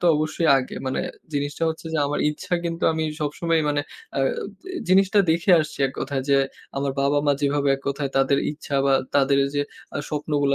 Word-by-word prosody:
তো 175 Hz, -, +1 dB
অবশ্যই 155 Hz, +2 st, 0 dB
আগে 130 Hz, -, -5 dB
মানে 130 Hz, -, -1 dB, 0.3 s
জিনিসটা 145 Hz, +2 st, -2 dB
হচ্ছে 160 Hz, +1 st, -5 dB
যে, 160 Hz, -, 0 dB
আমার 145 Hz, -, -1 dB
ইচ্ছা 150 Hz, -, -8 dB
কিন্তু 165 Hz, 0 st, -3 dB
আমি 160 Hz, 0 st, -1 dB, 0.2 s
সবসময় 160 Hz, +2 st, 0 dB
মানে 145 Hz, 0 st, +1 dB, 0.4 s
আ -, -, +1 dB, 0.5 s
জি 380 Hz, -, -8 dB, 0.3 s
জিনিসটা 195 Hz, +1 st, +3 dB
দেখে 170 Hz, +4 st, +2 dB
আসছি 155 Hz, 0 st, -5 dB
এক 135 Hz, -, -6 dB
কথায় 135 Hz, -1 st, -2 dB
যে, 140 Hz, -, +6 dB, 0.4 s
আমার 140 Hz, 0 st, -1 dB
বাবা 140 Hz, +1 st, +2 dB
মা 145 Hz, -, +5 dB
যেভাবে 145 Hz, 0 st, +1 dB
এক -, -, -15 dB
কথায় 140 Hz, 0 st, -2 dB
তাদের 135 Hz, +1 st, +3 dB
ইচ্ছা 145 Hz, -2 st, -4 dB
বা 135 Hz, -, +4 dB, 0.2 s
তাদের 140 Hz, 0 st, +4 dB, 0.2 s
যে 145 Hz, -, +2 dB, 0.3 s
আ -, -, -1 dB
স্বপ্নগুলা 145 Hz, -2 st, 0 dB
145 Hz, 195 wpm, -23 LUFS, 140-160 Hz, 0.5 s, যে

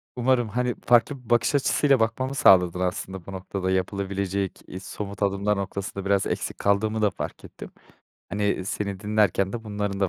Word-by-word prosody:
Umarım. 125 Hz, -1 st, +2 dB
Hani, 125 Hz, +2 st, -1 dB
farklı 125 Hz, +2 st, +3 dB
bir -, -, -17 dB
bakış 120 Hz, +4 st, +3 dB
açısıyla 140 Hz, -1 st, +3 dB
bakmamı 130 Hz, +5 st, 0 dB
sağladın 90 Hz, -6 st, +5 dB
aslında 90 Hz, 0 st, -3 dB
bu 100 Hz, -, -8 dB
noktada 95 Hz, 0 st, -3 dB
yapılabilecek, 95 Hz, 0 st, -2 dB
eee, 95 Hz, -, -7 dB
somut 100 Hz, +1 st, -6 dB
adımlar 100 Hz, +1 st, +1 dB
noktasında 100 Hz, 0 st, -4 dB
biraz 100 Hz, -1 st, +2 dB
eksik -, -, -3 dB
kaldığımı 105 Hz, +2 st, +1 dB
da 105 Hz, -, +4 dB
fark -, -, -7 dB
ettim, -, -, -11 dB, 0.6 s
hani, 100 Hz, -1 st, -1 dB
seni 100 Hz, 0 st, -3 dB
dinlerken 105 Hz, -2 st, +1 dB
de 115 Hz, -1 st, -5 dB
bunların 105 Hz, -2 st, -3 dB
da 95 Hz, -, +2 dB
100 Hz, 165 wpm, -25 LUFS, 95-110 Hz, 0.6 s, sağladın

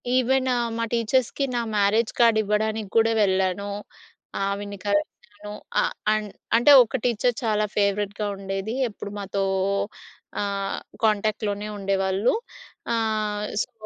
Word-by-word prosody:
Even 260 Hz, +1 st, +2 dB, 0.3 s
మా 230 Hz, -, -1 dB
టీచర్స్‌కి 240 Hz, +4 st, +1 dB
నా 240 Hz, -, +1 dB, 0.2 s
మ్యారేజ్ 210 Hz, +3 st, +2 dB
కార్డ్ 230 Hz, -2 st, +5 dB
ఇవ్వడానికి 215 Hz, 0 st, -1 dB
గూడా 225 Hz, 0 st, +4 dB
వెళ్ళాను. 190 Hz, +1 st, 0 dB, 0.7 s
ఆవిడని 200 Hz, +1 st, -3 dB
కలిశాను. 205 Hz, 0 st, -3 dB, 0.3 s
ఆహ్, -, -, 0 dB, 0.2 s
అండ్ 215 Hz, -1 st, -2 dB, 0.2 s
అంటే 240 Hz, +5 st, +6 dB
ఒక 240 Hz, +3 st, -3 dB
టీచర్ 245 Hz, 0 st, +1 dB
చాలా 215 Hz, -2 st, +1 dB
ఫేవరెట్‌గా 205 Hz, 0 st, 0 dB
ఉండేది. 195 Hz, +3 st, -4 dB
ఎప్పుడు 205 Hz, -1 st, -8 dB
మాతో 195 Hz, 0 st, -2 dB, 1.0 s
ఆహ్, 200 Hz, -1 st, -2 dB, 0.2 s
కాంటాక్ట్‌లోనే 210 Hz, -1 st, 0 dB
ఉండేవాళ్ళు. 195 Hz, +2 st, +1 dB, 0.6 s
ఆహ్, 215 Hz, -2 st, -1 dB, 0.2 s
సో, -, -, -14 dB
210 Hz, 115 wpm, -24 LUFS, 200-225 Hz, 1.0 s, అంటే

